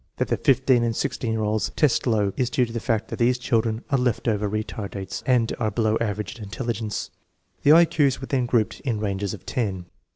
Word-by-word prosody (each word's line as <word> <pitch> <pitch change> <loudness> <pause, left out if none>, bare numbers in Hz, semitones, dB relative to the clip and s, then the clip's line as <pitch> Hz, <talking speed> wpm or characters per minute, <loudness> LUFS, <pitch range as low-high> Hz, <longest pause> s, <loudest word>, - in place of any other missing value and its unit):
That - - -1
the - - +1
15 130 -2 +3
and 115 -1 0
16 115 0 -2
year 110 -1 -1
olds 105 0 0
test 145 -4 +2
low 105 -4 +1
is 125 -2 0
due 125 - +2
to 115 - -9
the 115 - -2
fact 115 -1 -1
that - - -6
these 125 +1 +3
children 115 -2 0
are 135 - +3
left 125 -2 0
over 105 -2 +1
retardates 100 -2 -4
and 120 -3 +2
are 110 -2 +1
below 110 -1 +1
average 105 +1 -3
in - - -7
intelligence. 110 0 -4 0.5
The 145 - +6
I 170 +1 +8
Q's 145 -6 +1
were 135 - -6
then 130 -3 0
grouped 115 -3 +1
in 120 -7 -2
ranges 100 -2 -2
of - - -16
ten. 95 -7 -2
115 Hz, 220 wpm, -24 LUFS, 105-125 Hz, 0.5 s, I